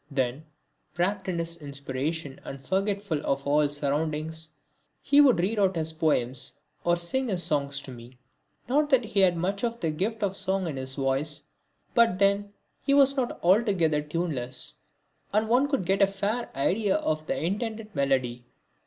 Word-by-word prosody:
Then, 135 +1 -1 0.5
wrapt 190 +2 0
in 180 -2 -1
his 170 0 -2
inspiration 140 0 -4
and 135 -1 -9
forgetful 195 -4 -1
of 140 0 -1
all 145 +1 +3
surroundings, 155 +2 -2 0.5
he 285 +1 +5
would 260 -9 +5
read 205 +5 0
out 190 -2 +3
his 160 -1 -1
poems 140 -6 0 0.3
or 175 0 +2
sing 255 +10 -1
his 180 -3 0
songs 140 -2 0
to 135 - -10
me. 120 +1 -12 0.5
Not 290 +4 +2
that 260 -4 +4
he 210 -2 -1
had 180 -3 +4
much 195 +5 -2
of 235 0 -1
the 165 - 0
gift 210 +8 -2
of 195 -1 0
song 190 -1 +1
in 160 -4 -3
his 130 0 -4
voice; 140 +2 0 0.5
but 230 -6 +4
then 200 +1 +2 0.3
he 280 - +3
was 275 -1 +6
not 255 -3 -2
altogether 180 -6 +3
tuneless, 145 -6 -3 0.5
and 215 +2 +2
one 250 +5 +3
could 275 - -1
get 195 +2 +2
a 195 - +7
fair 200 +5 -2
idea 195 +9 +1
of 155 - -1
the - - -1
intended 215 +4 -3
melody. 130 -4 0
170 Hz, 170 wpm, -27 LUFS, 145-205 Hz, 0.5 s, a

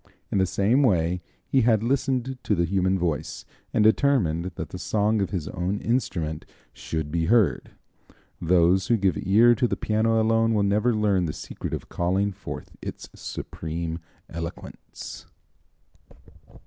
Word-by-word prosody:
In 100 - +1
the 95 - +3
same 110 +9 +2
way 90 - +2 0.2
he 135 - +2
had 110 -2 +3
listened 130 0 0
to 105 - 0
the 85 -1 +1
human 95 +1 +1
voice, 85 -4 -3 0.3
and 105 - +2
determined 110 - +3
that 80 - -5
the 90 - -7
song 105 +2 +1
of 95 - -1
his 90 -6 -3
own 95 +4 -2
instrument 85 -10 -1 0.3
should 80 -2 -4
be 85 0 0
heard. 110 0 +2 0.7
Those 90 +2 +3
who 120 - +3
give 95 -3 +1
ear 110 +6 +5
to 125 +1 +1
the - - -2
piano 110 +1 +1
alone 115 0 +2
will 105 - +2
never 105 +4 +2
learn 100 -4 +2
the 75 - -3
secret - - -7
of - - -5
calling 95 +4 0
forth 100 +1 -8
its - - -7
supreme 80 +1 -5 0.3
eloquence. 85 +1 -8
100 Hz, 150 wpm, -25 LUFS, 85-115 Hz, 0.7 s, ear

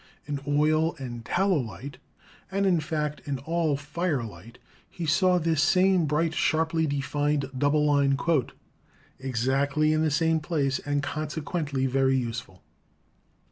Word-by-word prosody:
In 145 -1 -3
oil 155 +3 +2
and 120 -4 -7
tallow 190 - +1
light, 125 +3 -7 0.5
and 195 +1 0
in 180 -3 +3
fact 150 -2 -3
in 140 -2 -2
all 160 +1 0
firelight, 135 - -4 0.3
he 170 - -6
saw 180 +3 +3
this 160 -3 +1
same 185 +1 +3
bright, 155 +2 +1
sharply 160 0 +1
defined 145 0 -1
double 145 +3 +2
line 140 -2 +3 1.0
"exactly 135 +4 +1
in 155 - +1
the 160 - +2
same 160 +2 +2
place 145 -4 -1
and 145 0 -2
consequently 150 -1 -2
very 135 0 +2
useful." 115 -7 -5
145 Hz, 130 wpm, -26 LUFS, 135-160 Hz, 1.0 s, in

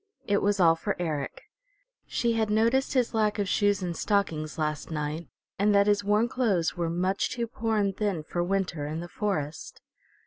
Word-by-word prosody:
It 205 0 +2
was 205 0 +1
all 165 -2 +6
for 200 +5 -2
Eric. 155 -5 -3 0.6
She 235 -1 0
had 220 -1 0
noticed 230 +6 +2
his 250 -2 +2
lack 215 -1 +1
of 200 -2 0
shoes 205 0 +2
and 175 -2 -2
stockings 160 -7 -1
last 155 -1 -2
night, 155 +1 -3 0.3
and 205 +1 +3
that 200 0 +5
his 205 0 +2
worn 210 +3 +3
clothes 210 -10 0
were 170 -2 -1
much 185 +3 0
too 245 -2 -2
poor 225 -1 -2
and 200 -2 +1
thin 200 -7 -1
for 175 +3 -2
winter 175 -5 -1
in 155 +2 -4
the 175 - -6
forest. 175 -6 -3
200 Hz, 185 wpm, -27 LUFS, 165-210 Hz, 0.6 s, all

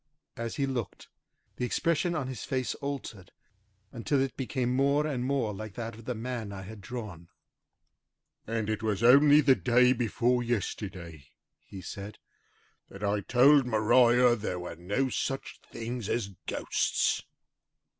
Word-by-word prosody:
As 115 0 -4
he 140 - 0
looked, 125 -6 -5 0.5
the - - -3
expression 170 +6 0
of 145 -6 -2
his 130 -4 -6
face 130 -2 -2
altered 135 -9 -6 0.6
until 130 +3 -1
it 135 -1 -1
became 125 -1 -1
more 140 +3 +2
and 135 -5 -2
more 130 -5 0
like 105 0 -8
that 115 -1 -5
of 115 +1 -13
the 125 - -3
man 115 -2 -4
I 95 -1 -7
had 105 +2 -10
drawn. 100 -7 -7 1.2
"And 110 -1 -2
it 110 -1 -2
was 110 -1 -1
only 145 +4 +7
the 135 -2 +5
day 125 0 +4
before 120 +1 +1
yesterday," 95 - -4 0.3
he 95 - -11
said, 100 +3 -7 0.7
"that 100 +1 -10
I 100 0 +1
told 130 +5 +5
Maria 120 +2 +4
there 105 -5 -4
were 90 -1 -6
no 100 +11 -1
such 135 +2 -3
things 115 -1 -5
as 115 -4 -1 0.2
ghosts!" - - 0
120 Hz, 145 wpm, -29 LUFS, 105-130 Hz, 1.2 s, only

